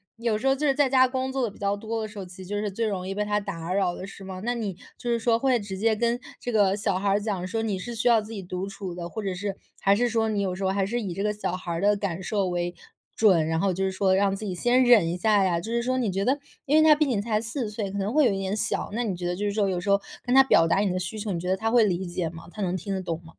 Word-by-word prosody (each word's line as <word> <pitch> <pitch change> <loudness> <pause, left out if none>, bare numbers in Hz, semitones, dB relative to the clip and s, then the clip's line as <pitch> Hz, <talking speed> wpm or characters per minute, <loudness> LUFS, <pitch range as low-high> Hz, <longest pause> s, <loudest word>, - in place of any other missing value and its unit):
有 230 -2 0
时 265 +5 -2
候 270 - +4
就 300 +2 -2
是 275 - +4
在 285 -1 +3
家 260 -1 +5
工 260 +1 -2
作 265 -2 0
的 220 - -1
比 - - -17
较 200 0 0
多 225 +2 -4
的 215 - -3
时 210 0 -13
候， 195 - -5
其 180 +1 -13
实 185 - -9
就 205 +3 -4
是 205 -2 -2
最 225 +3 -1
容 185 -3 -3
易 195 - -3
被 210 +1 -1
他 210 0 0
打 180 -3 -4
扰 190 -3 +1
的， 190 - -7
是 195 - -11
吗？ 190 -1 -7
那 245 0 0
你 210 -5 -3 0.2
就 240 - -3
是 235 - +1
说 230 0 +2
会 255 -1 +2
直 200 -2 -6
接 220 +2 +2
跟 235 +2 +1 0.2
这 245 - -4
个 200 -2 +3
小 200 -3 0
孩 200 +1 0
儿 200 +1 +3
讲， 195 -4 -2
说 225 +4 -2
你 210 -4 -1
是 235 +6 -6
需 225 +2 -1
要 230 -2 +5
自 215 +2 -10
己 205 -3 -5
独 185 +1 -4
处 195 -3 -6
的， 175 -1 -5
或 220 - -5
者 190 -2 -3
是 200 +1 -4 0.2
还 195 - +4
是 240 +4 +2
说 225 -1 +1
你 210 - -1
有 190 -2 -1
时 195 - -5
候 190 - +2
还 195 0 +1
是 240 +4 -2
以 190 -4 -4
这 195 - -4
个 210 0 +1
小 185 -3 -3
孩 185 -1 -9
儿 165 - -3
的 205 0 +3
感 190 -2 -3
受 200 -1 0
为 175 0 -2 0.4
准， 185 -8 +5
然 160 0 0
后 195 -1 +1
就 190 +2 -2
是 190 - +1
说 190 0 +2
让 195 0 +2
自 210 +2 -5
己 185 -2 -3
先 245 +7 +3
忍 215 -9 +6
一 175 - -2
下 205 +1 +3
呀？ 175 -3 +1
就 220 - -7
是 235 - +1
说 255 +1 0
你 235 -5 0
觉 195 +1 -1
得 270 +5 +1 0.3
因 295 +2 +3
为 - - +7
他 300 - +8
毕 305 0 +2
竟 235 -7 0
才 215 -1 0
4 230 0 -3
岁， 210 -2 -4
可 200 - -4
能 200 +4 -1
会 305 -2 +5
有 230 - +4
一 195 - -2
点 195 +1 -2
小， - - -1
那 240 - -1
你 210 -5 -1
觉 175 0 -3
得 175 - -1
就 205 - -4
是 205 - 0
说 205 -1 +1
有 180 -2 -1
时 200 - -4
候 200 0 +5 0.2
跟 245 - -1
他 270 - +9
表 165 -10 +5
达 165 - +2
你 205 - +2
的 185 - -1
需 185 +4 -4
求， 205 -1 -3
你 170 - -2
觉 180 - -3
得 190 - +2
他 225 +2 -1
会 235 -1 +5
理 185 -2 0
解 175 -1 -2
吗？ 165 0 -11
他 210 - -7
能 185 -1 0
听 195 +3 -4
得 190 - -2
懂 165 -3 -3
吗？ - - -12
200 Hz, 365 characters per minute, -26 LUFS, 185-225 Hz, 0.4 s, 他